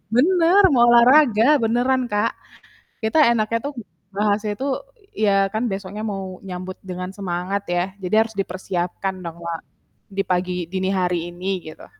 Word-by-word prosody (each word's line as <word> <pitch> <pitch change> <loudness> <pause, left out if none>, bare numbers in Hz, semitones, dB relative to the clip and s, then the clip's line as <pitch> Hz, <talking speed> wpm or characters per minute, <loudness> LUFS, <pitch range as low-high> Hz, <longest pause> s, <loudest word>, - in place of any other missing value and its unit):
bener 350 +7 +5
mau 240 -2 +5
olahraga 245 +1 +6
beneran 245 +3 +2
Kak. 210 +2 +1 0.7
Kita 220 +8 +1
enaknya 230 0 0
tuh 290 - -5 0.4
bahasnya 210 +1 0
tuh 275 +1 -1 0.4
ya 195 -2 +3
kan 220 +3 -1
besoknya 195 +2 -5
mau 190 -3 -5
nyambut 185 0 -7
dengan 185 0 -6
semangat 190 0 -3
ya 175 0 +1 0.2
jadi 185 +1 -2
harus 225 - -9
dipersiapkan 185 -1 -3
dong 170 -1 -6
wa 170 -1 -4 0.5
di 195 0 -3
pagi 180 -1 -1
dini 190 0 -1
hari 180 -2 -1
ini 180 +2 -5 0.2
gitu. 155 - -10
195 Hz, 145 wpm, -22 LUFS, 180-230 Hz, 0.7 s, olahraga